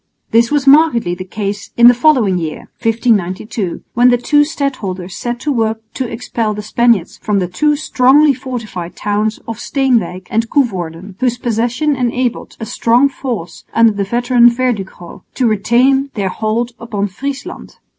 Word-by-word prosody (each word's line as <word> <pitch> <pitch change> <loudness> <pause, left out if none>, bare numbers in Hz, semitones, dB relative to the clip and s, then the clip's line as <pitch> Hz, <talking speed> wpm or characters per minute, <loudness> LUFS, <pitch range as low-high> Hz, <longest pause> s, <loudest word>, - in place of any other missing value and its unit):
This 230 +1 +4
was 290 -2 0
markedly 275 - +4
the 180 +1 -5
case 200 +2 -5
in 235 0 +8
the 245 - +8
following 245 - +3
year 160 -2 -4 0.2
(1592) 215 -4 -1
when 245 +1 +5
the 245 - +4
two 295 +5 +3
stadholders 225 - -3
set 240 +5 -4
to 300 - -1
work 225 -3 -1
to 255 -3 -4
expel 225 -2 -3
the 210 - -6
Spaniards 225 -4 +1
from 210 -1 0
the 185 -2 0
two 295 +12 +1
strongly 285 0 +4
fortified 230 -9 -6
towns 210 +1 -1
of 230 0 -5
Steenwijk 240 -11 0
and 225 +1 0
Coevorden, 185 - -2
whose 245 -2 0
possession 240 +5 0
enabled 245 -1 -2
a 225 - -5
strong 240 +5 +2
force 225 -12 -6
under 230 -1 +5
the 200 -1 -2
veteran 240 +3 +4
Verdugo 225 -8 -4
to 255 - 0
retain 245 +6 +2
their 200 -3 -1
hold 220 +4 -2
upon 210 -4 -3
Friesland. 270 +8 -6
230 Hz, 155 wpm, -15 LUFS, 205-255 Hz, 0.2 s, in